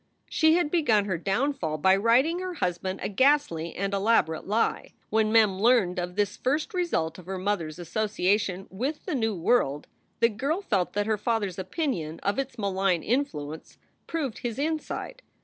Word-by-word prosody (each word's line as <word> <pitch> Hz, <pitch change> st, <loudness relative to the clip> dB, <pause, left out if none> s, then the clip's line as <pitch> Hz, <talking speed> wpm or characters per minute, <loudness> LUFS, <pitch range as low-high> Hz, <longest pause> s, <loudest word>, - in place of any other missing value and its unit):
She 315 Hz, 0 st, +4 dB
had 345 Hz, -4 st, +1 dB
begun 230 Hz, -, +3 dB
her 185 Hz, -5 st, -2 dB
downfall 195 Hz, -, -1 dB
by 190 Hz, +5 st, +4 dB
writing 250 Hz, -, +3 dB
her 370 Hz, -1 st, -4 dB
husband 185 Hz, -, -2 dB
a -, -, 0 dB
ghastly 205 Hz, -, +2 dB
and 200 Hz, +1 st, -2 dB
elaborate 195 Hz, -6 st, +1 dB
lie. 220 Hz, +3 st, 0 dB, 0.2 s
When 215 Hz, 0 st, +2 dB
Mem 215 Hz, -4 st, +4 dB
learned 205 Hz, -6 st, +3 dB
of 180 Hz, 0 st, -4 dB
this 205 Hz, +1 st, 0 dB
first 300 Hz, +10 st, -1 dB
result 250 Hz, -, -1 dB
of 180 Hz, -, -14 dB
her 190 Hz, 0 st, -3 dB
mother 185 Hz, -3 st, -1 dB
s 155 Hz, -, -9 dB
association 195 Hz, 0 st, 0 dB
with 265 Hz, +11 st, -3 dB
the -, -, -2 dB
new 225 Hz, -6 st, 0 dB
world, 165 Hz, -, +1 dB, 0.3 s
the 230 Hz, -, +5 dB
girl 275 Hz, -, -1 dB
felt 195 Hz, -, 0 dB
that 205 Hz, 0 st, 0 dB
her 215 Hz, -1 st, 0 dB
father 225 Hz, -2 st, 0 dB
s 180 Hz, -, -9 dB
opinion 185 Hz, -, -3 dB
of 200 Hz, +6 st, 0 dB
its 270 Hz, -1 st, -4 dB
malign 195 Hz, -4 st, 0 dB
influence 160 Hz, -, -3 dB, 0.3 s
proved 290 Hz, -8 st, -3 dB
his 235 Hz, -2 st, -4 dB
insight. 315 Hz, -, -3 dB
210 Hz, 175 wpm, -27 LUFS, 185-265 Hz, 0.3 s, the